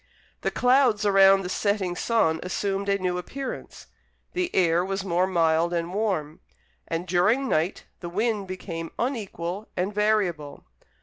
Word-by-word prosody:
The - - 0
clouds 250 -4 +3
around 195 -1 +6
the - - -4
setting 190 -1 -1
sun 175 -8 +1
assumed 195 +2 -2
a 200 - +3
new 180 -2 -1
appearance; 270 +9 -7 0.5
the 360 -1 -1
air 175 -1 +3
was 195 +1 -3
more 180 0 +1
mild 170 -1 +2
and 170 +1 -2
warm, 185 -8 -1 0.5
and 165 +2 -3
during 210 +10 +2
night 165 -3 0
the 175 - -6
wind 210 +1 -1
became 170 -3 -6
unequal 205 -6 -3
and 190 +3 -1
variable. 195 -9 0
190 Hz, 140 wpm, -25 LUFS, 175-210 Hz, 0.5 s, around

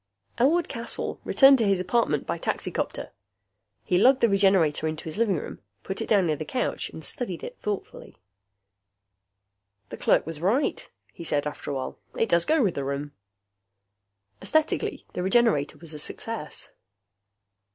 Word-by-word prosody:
Elwood 315 +7 +3
Caswell 230 0 -4
returned 270 -1 +6
to 225 - +2
his 195 -2 +3
apartment 185 - +1
by - - -3
taxicopter. - - -3 0.7
He 180 - +2
lugged 260 +5 +5
the 235 - +5
Regenerator 190 -6 +3
into 155 0 -4
his 160 - -5
living 210 -6 +2
room, 145 - -7 0.2
put 190 - -4
it - - -3
down 200 -4 +4
near 155 -2 +1
the 155 - -5
couch 250 - -2
and 160 - -9
studied 190 - -4
it - - -8
thoughtfully. 205 -2 -5 1.7
"That - - -8
clerk - - +3
was 160 -1 -6
right," 220 - 0 0.2
he - - -9
said 145 -3 0
after 150 - -5
a 140 - -2
while. 130 - -5 0.2
"It 225 - +1
does 170 -1 +3
go 315 -3 +3
with 190 -6 +2
the 140 - -3
room." 140 +1 -3 1.3
Esthetically, 315 0 0
the - - -3
Regenerator 190 -6 +2
was 165 -2 -9
a 150 - -7
success. 220 +2 -5
190 Hz, 160 wpm, -26 LUFS, 155-235 Hz, 1.7 s, returned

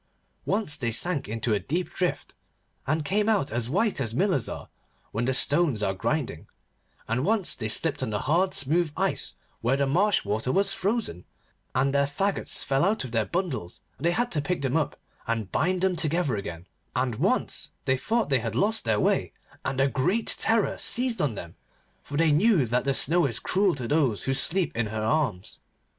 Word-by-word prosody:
Once 195 -8 +1
they 120 -5 -1
sank 145 - 0
into 115 +1 -1
a 105 - +1
deep 160 - -2
drift, 180 -1 -2 0.5
and 155 +2 0
came 210 +4 +1
out 205 -10 +1
as 120 +1 -1
white 200 - +1
as 115 0 -2
millers 185 - +1
are, - - -7 0.4
when 115 +3 -1
the 130 - +1
stones 145 -6 +2
are 95 -1 +1
grinding; 120 - -2 0.6
and 115 +3 0
once 205 +1 +1
they 110 -3 -4
slipped 155 +7 0
on 130 - -1
the 105 -1 -2
hard 175 +7 +1
smooth 155 +4 +1
ice - - -1 0.3
where 125 +4 +2
the 140 - +2
marsh 185 - +2
water 110 +5 -1
was 195 +3 +1
frozen, 200 - -1 0.5
and 135 +2 +2
their 140 0 +3
faggots 195 +8 -1
fell 135 0 +2
out 200 0 +1
of 125 - -7
their 110 -2 +1
bundles, 165 - -3 0.2
and 150 - -4
they - - +3
had 240 +6 0
to 150 - 0
pick 155 0 -2
them 135 +1 0
up 160 -3 -1 0.3
and 115 -5 -2
bind 180 - +1
them 190 -1 +2
together 160 -5 +1
again; 90 -4 -6 0.3
and 125 -3 0
once - - 0 0.2
they 130 - +3
thought 220 - 0
that 135 - +3
they - - -1
had - - -4
lost 215 - +1
their 110 -2 +2
way, - - +1 0.3
and 130 - -2
a 135 - +4
great 180 - +1
terror 225 -2 +2
seized 245 -4 +1
on 140 -7 0
them, 85 -3 -8 0.5
for 145 - -6
they 165 -1 +4
knew 170 - +4
that 120 +3 0
the 135 - +2
Snow 165 +3 +4
is 115 -3 -3
cruel 190 -2 +1
to 125 -4 -4
those 140 -8 +1
who 135 - 0
sleep 165 +5 +2
in 115 -1 0
her 110 +1 -3
arms. 110 -6 -1
145 Hz, 200 wpm, -26 LUFS, 120-180 Hz, 0.6 s, a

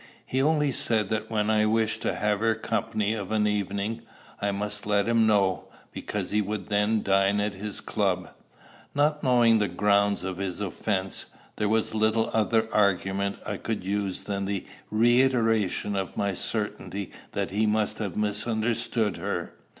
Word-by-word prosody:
He 130 - 0
only 150 0 +2
said 110 -4 0
that 110 0 -2
when 110 -1 +1
I 110 0 +3
wished 110 0 +1
to - - -1
have 105 -1 0
her 110 0 +1
society 110 -2 -1
of 105 -3 -5
an 110 -1 +2
evening, 105 +2 -1 0.4
I 100 0 +1
must 105 +1 -4
let 100 -1 +2
him 115 -1 +4
know, 100 -3 +2 0.3
because - - -4
he 105 +1 +2
would 105 -2 -4
then 105 +1 +2
dine 100 +1 +3
at 105 0 0
his 100 +1 -4
club. 95 -4 -1 0.6
Not 150 +1 +2
knowing 120 -3 +5
the 105 - +2
grounds 100 +1 +2
of 95 -1 -4
his 95 -2 -3
offence, 95 -1 -2 0.3
there 105 - 0
was 110 0 +1
little 110 +1 +2
other 110 0 +2
argument 100 -1 +1
I - - -3
could 110 -4 -3
use 100 0 -2
than 100 -1 -3
the 100 -1 -2 0.2
reiteration 115 -3 +2
of 95 -2 -3
my 100 -1 0
certainty 100 -1 -2 0.2
that - - -2
he 105 +2 +1
must 105 0 0
have 100 -6 -3
misunderstood 110 0 0
her. - - -3
105 Hz, 165 wpm, -27 LUFS, 100-110 Hz, 0.6 s, knowing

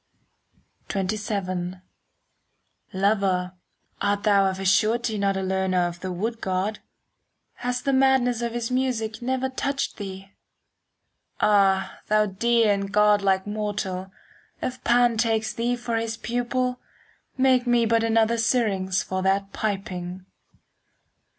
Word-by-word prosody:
XXVII 190 -2 -2 1.2
Lover, 190 -2 +1 0.5
art 205 0 0
thou 200 -2 +4
of 190 0 -2
a 195 - -4
surety 220 +2 +2
Not 195 -1 +1
a 190 - -2
learner 190 -1 +1
of 175 0 -7
the 185 +1 -4
wood 225 +6 -3
god? 190 +3 -1 0.8
Has 250 0 -2
the 275 - +1
madness 260 -3 +3
of 235 -1 -2
his 240 0 -3
music 245 -4 -1
Never 260 +1 -1
touched 275 +1 -2
thee? 195 -2 -8 1.1
Ah, 195 -2 +3
thou 215 0 +3
dear 225 +2 +2
and 200 0 -3
godlike 205 -2 +3
mortal, 205 -3 -3 0.5
5 255 - -2
If 255 - -19
Pan 240 -1 +3
takes 220 -1 +1
thee 240 +1 0
for 235 -1 -3
his 225 0 -2
pupil, 250 +2 -1 0.6
Make 260 -1 +3
me 240 -1 +3
but 225 0 +2
another 225 0 +2
Syrinx 200 -6 +1
For 185 0 -3
that 195 +1 0
piping. 185 -3 -4
215 Hz, 125 wpm, -24 LUFS, 190-235 Hz, 1.2 s, thou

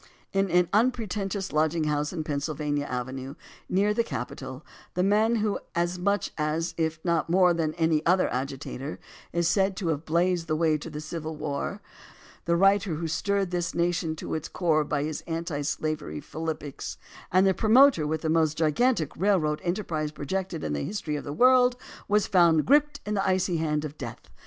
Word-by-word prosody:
In 195 0 +1
an 180 0 +3
unpretentious 210 -4 0
lodging 155 +1 +2
house 150 -1 0
in 165 -3 -3
Pennsylvania 145 0 -2
Avenue, 130 +2 -5 0.3
near 200 +3 +2
the 235 - +1
Capitol, 130 - -6 0.3
the 180 - +2
man 215 +4 +3
who 215 -2 0 0.2
as 175 +1 0
much, 200 +3 0
if 160 +1 -1
not 170 -2 +1
more 180 0 +5
than 160 -2 -1
any 160 -2 +2
other 180 +2 +3
agitator, 135 +2 -4 0.3
is 170 0 +1
said 195 +1 +2
to 180 -6 -2
have 155 -1 -1
blazed 170 +1 +1
the 155 - 0
way 160 -1 +2
to 150 +2 -5
the 150 -1 -6
Civil 160 0 -5
War, 150 +7 -4 0.6
the 170 - +2
writer 195 -1 +3
who 165 +2 -3
stirred 195 +3 0
this 175 -1 -2
nation 170 -2 0
to - - -6
its 155 - -3
core 160 -4 +1
by 145 -1 -1
his 155 0 -3
anti 165 -2 -3
slavery 150 - -3
philippics, 155 - -5 0.3
and 185 +2 +5
the 190 - +4
promoter 225 - +5
with 155 0 -2
the 160 - -2
most 160 -1 +2
gigantic 160 - +1
railroad 170 -6 +1
enterprise 175 -5 -2
projected 170 +3 -4
in 75 - -2
the 70 - -2
history 175 -6 -3
of 145 - -5
the 145 - -4
world, 250 - +5 0.3
was 210 0 +3
found 170 -4 +4
gripped 295 +1 +3
in 210 - -2
the 195 -1 0
icy 185 -2 +1
hand 155 -1 -1
of 150 0 -8
death. 120 -3 -8
165 Hz, 180 wpm, -27 LUFS, 150-195 Hz, 0.6 s, more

